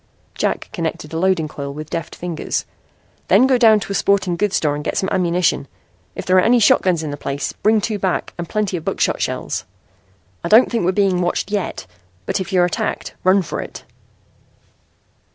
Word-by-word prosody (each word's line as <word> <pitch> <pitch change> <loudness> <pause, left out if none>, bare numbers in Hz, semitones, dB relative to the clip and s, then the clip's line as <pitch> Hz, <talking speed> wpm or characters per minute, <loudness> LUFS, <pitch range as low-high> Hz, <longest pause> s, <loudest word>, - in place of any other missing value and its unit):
Jack - - -1
connected 165 -4 -4
a 160 - -1
loading 185 -3 +2
coil 140 -2 -6
with 155 0 -8
deft 165 -1 -4
fingers. 175 -2 -3 0.6
"Then 255 - +5
go 260 -2 +3
down 220 -3 +6
to - - -6
a - - 0
sporting 200 -3 +1
goods 205 +2 0
store 150 -2 +1
and 145 0 -4
get - - -2
some 190 - 0
ammunition. 175 -5 +1 0.5
If - - -6
there 185 0 +3
are - - +7
any 235 +5 +4
shotguns 185 -5 +3
in 150 - -4
the 145 - -5
place 140 0 -3
bring 215 0 +2
two 210 0 -2
back 190 -2 -1
with 170 -1 -6
plenty 210 -4 -1
of 160 - -7
buckshot - - 0
shells. - - -2 0.8
I 170 - -2
don't 225 +6 +6
think 230 -7 0
we're 185 - +3
being 190 -2 +2
watched 175 +3 -1
yet, 205 -3 -2 0.4
but - - -1
if 190 +2 -6
you're 180 -2 +4
attacked, 175 - -3
run 190 +1 +4
for - - -4
it." - - -9
185 Hz, 195 wpm, -19 LUFS, 165-205 Hz, 0.8 s, are